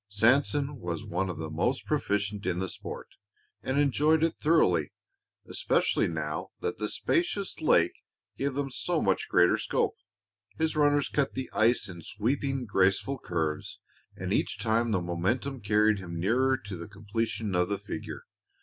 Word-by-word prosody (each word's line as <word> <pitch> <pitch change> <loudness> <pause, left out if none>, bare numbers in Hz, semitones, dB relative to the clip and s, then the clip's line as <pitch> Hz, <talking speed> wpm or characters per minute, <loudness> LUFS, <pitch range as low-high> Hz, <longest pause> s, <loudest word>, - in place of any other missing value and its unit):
Sanson 135 +7 +2
was 90 +4 -4
one 95 -2 -1
of 90 - -4
the 80 -1 -5
most 120 +12 0
proficient 100 -8 -1
in 90 -1 0
the 95 +1 -1
sport - - -8 0.4
and 130 - -1
enjoyed 150 +3 +3
it 165 - +2
thoroughly, 160 +1 +3 0.6
especially - - +1
now - - -3
that 445 0 -3
the - - -1
spacious 335 - -1
lake 85 - +4 0.4
gave 140 -1 -2
them 140 -1 -2
so 170 +5 0
much 95 -7 +1
greater 90 0 +5
scope. - - 0 0.6
His 160 0 0
runners 145 -1 +3
cut 140 -2 0
the 130 - -4
ice 115 +2 +3
in 85 -3 -8
sweeping, 130 - -1
graceful 100 +6 +1
curves, 80 -3 -3 0.4
and - - -3
each - - 0
time 115 +1 +1
the 95 -5 +1
momentum 115 +10 -1
carried 105 +1 +3
him 85 -2 -6
nearer 130 +8 +2
to 100 -4 -8
the 85 - -7
completion 105 +1 -3
of 90 0 +2
the 100 - 0
figure. 100 +2 -7
110 Hz, 160 wpm, -29 LUFS, 95-140 Hz, 0.6 s, greater